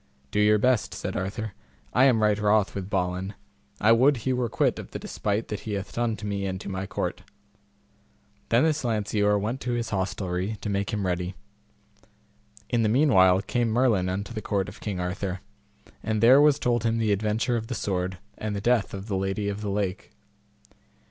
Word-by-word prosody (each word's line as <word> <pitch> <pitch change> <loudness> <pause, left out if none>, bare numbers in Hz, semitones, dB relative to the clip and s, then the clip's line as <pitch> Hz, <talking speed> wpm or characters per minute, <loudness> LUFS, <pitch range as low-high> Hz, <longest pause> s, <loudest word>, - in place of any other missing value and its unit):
Do - - 0
your 105 0 +5
best, 125 0 +1
said - - -4
Arthur, 105 +3 -3 0.4
I 130 +3 +5
am 115 -5 +4
right 105 -1 +3
wroth 105 -1 +2
with 95 -1 -5
Balin; 95 +1 -2 0.4
I 110 - +4
would 130 +4 +5
he 130 - +2
were 125 -2 -1
quit - - +1
of - - -8
the - - -5
despite 105 +2 -3
that 105 - -3
he 110 - -5
hath 100 0 -4
done 115 -2 0
to 105 - -8
me 100 -1 -2
and 95 0 -3
to - - -6
my 95 0 -4
court. - - -3 1.3
Then 115 +3 +4
this 155 -2 +1
Lanceor 105 -3 +1
went 110 +6 -3
to 125 - -2
his 115 -1 -2
hostelry 95 +1 -2
to 105 - -3
make 100 +2 -1
him 105 -3 -2
ready. 90 +1 -2 1.3
In 120 -2 +1
the 110 - +2
meanwhile 100 -8 +5
came 120 0 0
Merlin 110 -6 +2
unto 100 +5 -4
the 110 - -4
court 100 -2 -1
of 100 - -10
King 100 -4 -3
Arthur, 90 +1 -3 0.6
and 110 -1 -1
there 130 +5 +7
was 150 -1 +5
told 120 -5 0
him 115 0 +1
the 110 -2 +1
adventure 110 +4 0
of 115 -1 -3
the - - -3
sword, 95 -1 -2 0.2
and 105 -1 -3
the - - -2
death 115 -1 +1
of 95 0 -7
the 105 -3 -2
Lady 95 +2 -1
of 100 +1 -4
the 105 - -3
Lake. 100 -2 -2
105 Hz, 200 wpm, -26 LUFS, 95-115 Hz, 1.3 s, there